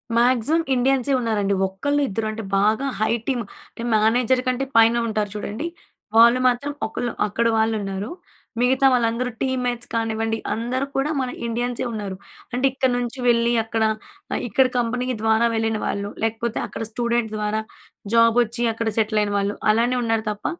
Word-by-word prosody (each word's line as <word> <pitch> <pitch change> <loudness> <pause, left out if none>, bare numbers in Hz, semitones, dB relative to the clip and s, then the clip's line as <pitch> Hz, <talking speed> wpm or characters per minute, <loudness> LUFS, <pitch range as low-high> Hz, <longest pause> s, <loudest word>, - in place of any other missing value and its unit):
Maximum 250 +6 +3
ఇండియన్సే 265 +1 +2
ఉన్నారండి. 210 -4 0
ఒక్కళ్ళు, 285 +10 -1
ఇద్దరు 220 +2 -2
అంటే 220 +1 -6
బాగా 215 +6 +2
హై 215 +1 +2
టీమ్, 250 -4 0 0.3
టిం 235 +1 -4
మేనేజర్ 240 +4 +3
కంటే 255 +2 0
పైన 230 +1 +6
ఉంటారు 215 -2 -1
చూడండి. 215 +9 -4 0.5
వాళ్ళు 235 +2 +7
మాత్రం 255 +4 0 0.2
ఒకళ్ళు, 240 +2 -3 0.2
అక్కడ 230 +3 0
వాళ్ళు 220 0 +2
ఉన్నారు. 195 +2 -4 0.5
మిగతా 260 +2 +3
వాళ్ళందరూ 240 +1 +1
టీమ్‌మేట్స్ 250 -2 -1
కానివ్వండి, 225 0 -1 0.2
అందరూ 245 +4 -2
కూడా 270 +3 +1
మన 255 - -2 0.2
ఇండియన్సే 245 +2 -2
ఉన్నారు. 205 -3 -4 0.4
అంటే 255 +2 +1
ఇక్కడ 265 -1 +1
నుంచి 245 +2 -4
వెళ్ళి 235 0 +3
అక్కడ, 225 0 -1 0.6
ఇక్కడ 250 +5 +3
కంపెనీ 245 +1 -1 0.2
ద్వారా 220 +1 +3
వెళ్ళిన 225 -1 0
వాళ్ళు, 200 0 -2
లేకపోతే 225 +1 -1
అక్కడ - - -6
స్టూడెంట్ 235 -1 -1
ద్వారా 210 +1 -1 0.5
జాబ్ 230 0 +5
వచ్చి 235 +1 -4
అక్కడ 225 0 -3
సెటిల్ 215 -1 +2
అయిన 205 - -2
వాళ్ళు. 200 +1 -1 0.2
అలానే 235 +3 +2
ఉన్నారు. 225 -1 0
తప్ప 210 0 -9
230 Hz, 155 wpm, -22 LUFS, 220-250 Hz, 0.6 s, వాళ్ళు